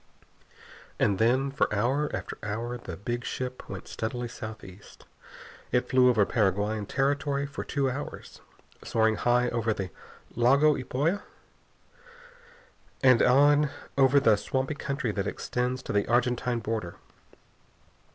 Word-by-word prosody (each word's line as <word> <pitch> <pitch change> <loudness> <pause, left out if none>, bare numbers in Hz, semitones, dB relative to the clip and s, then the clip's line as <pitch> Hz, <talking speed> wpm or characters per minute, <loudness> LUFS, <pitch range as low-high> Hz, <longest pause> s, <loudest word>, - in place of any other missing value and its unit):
And 100 -2 +1
then, 130 +5 +2
for 140 - 0
hour 130 +8 +1
after - - -5
hour, 115 +4 -3
the 90 -8 -8
big 120 +4 -4
ship 125 0 -5
went - - -7
steadily 120 +2 -4
southeast. 110 -4 -10 0.7
It 125 0 +1
flew 130 -1 +5
over 110 -5 +4
Paraguayan 105 0 0
territory 140 +1 0
for 140 +1 -6
two 140 -2 -1
hours, 130 +3 -6 0.4
soaring 110 -1 +2
high 125 0 +2
over 115 -2 -1
the 95 -3 -5 0.4
Lago 140 +6 +4
Ypoa 145 +10 -1 1.8
and 130 -3 +6
on 145 +3 +5 0.3
over 135 +1 +5
the 115 -7 +4
swampy 130 +7 -2
country 140 -4 -3
that 100 -2 -2
extends 125 +1 -2
to - - -4
the 100 0 +1
Argentine 120 0 +1
border. 110 -7 -3
125 Hz, 125 wpm, -27 LUFS, 110-135 Hz, 1.8 s, and